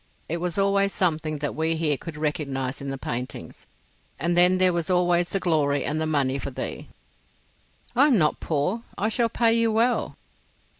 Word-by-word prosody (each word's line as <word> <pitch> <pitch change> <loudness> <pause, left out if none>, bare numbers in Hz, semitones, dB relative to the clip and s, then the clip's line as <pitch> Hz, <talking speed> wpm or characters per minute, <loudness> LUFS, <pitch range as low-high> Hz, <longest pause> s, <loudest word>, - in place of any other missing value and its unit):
It 170 - -2
was 175 +1 -3
always 200 0 +2
something 155 -4 0
that 145 -1 -3
we 160 +1 0
here 160 -2 +1
could 150 +3 -8
recognise 140 -3 -2
in 140 - -6
the 135 - -4
paintings. 125 0 -6 0.5
And 170 +4 0
then 180 +1 +5
there 185 -1 +3
was 170 0 -2
always 175 -1 +2
the 195 - -1
glory 150 -5 +1
and 155 +2 -1
the 160 - 0
money 140 -3 +1
for - - -4
thee." - - -6 1.1
"I 275 +4 +6
am 265 -6 +4
not 155 -4 +2
poor—I 190 +8 -2
shall 230 +1 +1
pay 230 0 +2
you 230 -1 +2
well." 230 +3 +1
165 Hz, 180 wpm, -25 LUFS, 150-195 Hz, 1.1 s, I